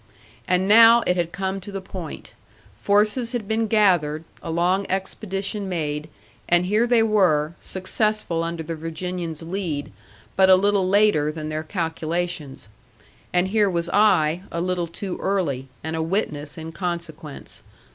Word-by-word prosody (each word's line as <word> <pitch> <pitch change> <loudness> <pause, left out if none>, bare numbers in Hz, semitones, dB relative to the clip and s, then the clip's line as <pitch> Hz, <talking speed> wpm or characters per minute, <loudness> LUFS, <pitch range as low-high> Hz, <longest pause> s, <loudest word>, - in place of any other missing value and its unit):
And 180 +1 +2
now 230 +2 +8
it 180 - +2
had 170 -1 -1
come 190 +1 -3
to 205 - -9
the 195 - -4
point; 185 -3 -8 0.5
forces 210 +4 +1
had 230 -5 -3
been 220 +1 0
gathered, 175 -8 +2 0.2
a - - -7
long 180 +4 +1
expedition 195 +1 -3
made, 150 -3 -3 0.4
and 175 +1 +4
here 215 +5 +2
they 235 -2 +4
were, 175 -8 +2
successful 190 -2 -1
under 165 -1 -4
the 165 +1 -5
Virginian's 165 0 -5
lead, 165 -5 -3 0.4
but 190 0 +5
a 185 - +9
little 195 -1 +2
later 200 -7 +3
than 155 0 -6
their 155 0 -2
calculations. 165 - -3 0.6
And 180 +1 +2
here 210 -1 +3
was 170 -1 -2
I, 180 -6 +3
a 170 - -3
little 180 -1 -1
too 180 +2 -6
early, 155 -10 -1 0.2
and 160 0 -3
a 160 - -1
witness 160 -4 -2
in 160 0 -7
consequence. 165 -4 -6
180 Hz, 150 wpm, -23 LUFS, 160-200 Hz, 0.6 s, a